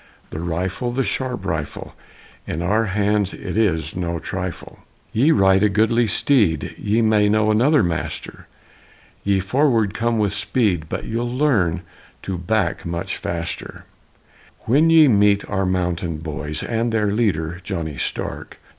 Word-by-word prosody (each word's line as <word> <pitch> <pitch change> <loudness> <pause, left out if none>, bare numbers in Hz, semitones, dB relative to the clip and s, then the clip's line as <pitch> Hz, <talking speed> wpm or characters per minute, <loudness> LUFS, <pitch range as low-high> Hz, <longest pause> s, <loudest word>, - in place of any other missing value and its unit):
The 80 - -5
rifle, 90 +8 -2
the 135 +2 0
sharp 125 -6 -3
rifle! 80 -6 -4 0.5
In 85 - -3
our 105 +5 +2
hands 100 0 0
it - - -6
is 95 -8 0
no 85 -1 -2
trifle! 90 +1 -6 0.3
Ye 130 +8 +3
ride 95 -8 +4
a 105 - +4
goodly 110 +3 +2
steed; 105 - +2
He 110 +3 0
may 105 -2 +3
know 110 0 +3
another 135 +8 +4
master: 85 -1 -4 0.8
Ye 100 -1 +2
forward 115 0 +1
come 115 +1 0
with 105 -2 +1
speed, 100 -5 0
But - - -4
ye'll 120 +2 -2
learn 110 - +1 0.4
to 95 - -3
back 95 -1 -1
much 85 +3 -4
faster, 85 -2 -5 0.8
When 145 +8 +3
ye 160 -2 +7
meet 100 -3 +3
our 95 -1 -1
mountain 90 -3 -1
boys 75 -1 -4
And 115 0 -1
their 105 -2 +1
leader, 90 -7 0
Johnny 85 -6 -4
Stark! - - -4
100 Hz, 145 wpm, -21 LUFS, 85-115 Hz, 0.8 s, ye